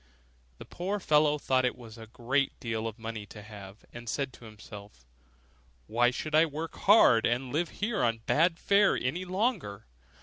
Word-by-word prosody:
The -, -, -11 dB
poor 195 Hz, +4 st, -4 dB
fellow 150 Hz, -3 st, +3 dB
thought 130 Hz, -3 st, +1 dB
it 125 Hz, -, -1 dB
was 115 Hz, -2 st, -12 dB
a 110 Hz, -, -10 dB
great 125 Hz, +4 st, -1 dB
deal 115 Hz, -2 st, -3 dB
of 110 Hz, 0 st, -7 dB
money 110 Hz, -2 st, -7 dB
to 105 Hz, +1 st, -11 dB
have, 100 Hz, -1 st, -12 dB
and 120 Hz, -1 st, -8 dB
said 135 Hz, -1 st, -2 dB
to 120 Hz, -, -14 dB
himself, 105 Hz, -, -13 dB, 0.8 s
'Why 120 Hz, +2 st, +2 dB
should 155 Hz, +5 st, -5 dB
I 160 Hz, +2 st, +5 dB
work 155 Hz, +2 st, -6 dB
hard, 195 Hz, -, +5 dB
and 125 Hz, +2 st, -2 dB
live 165 Hz, +2 st, 0 dB
here 215 Hz, +2 st, -2 dB
on 115 Hz, -1 st, +1 dB
bad 165 Hz, +2 st, +2 dB
fare 200 Hz, +2 st, +3 dB
any 170 Hz, +9 st, -3 dB
longer? 185 Hz, -, -2 dB
125 Hz, 175 wpm, -29 LUFS, 110-165 Hz, 0.8 s, I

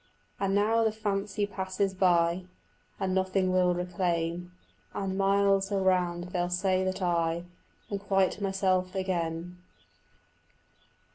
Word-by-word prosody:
And 195 Hz, 0 st, +1 dB
now 220 Hz, +3 st, +3 dB
the 220 Hz, -, +2 dB
fancy 205 Hz, -1 st, -1 dB
passes 190 Hz, 0 st, -2 dB
by, 175 Hz, -1 st, +2 dB, 0.5 s
And 190 Hz, -2 st, 0 dB
nothing 190 Hz, 0 st, +1 dB
will 180 Hz, -1 st, +3 dB
remain, 175 Hz, -1 st, -1 dB, 0.5 s
And 195 Hz, -1 st, -2 dB
miles 195 Hz, 0 st, +2 dB
around 180 Hz, -3 st, +1 dB
they'll 175 Hz, -1 st, 0 dB
say 185 Hz, +1 st, +1 dB
that 185 Hz, 0 st, -2 dB
I 170 Hz, -1 st, +1 dB, 0.5 s
Am 200 Hz, -, -1 dB
quite 195 Hz, 0 st, +1 dB
myself 190 Hz, -1 st, 0 dB
again. 180 Hz, -2 st, -2 dB
185 Hz, 115 wpm, -29 LUFS, 180-195 Hz, 0.5 s, now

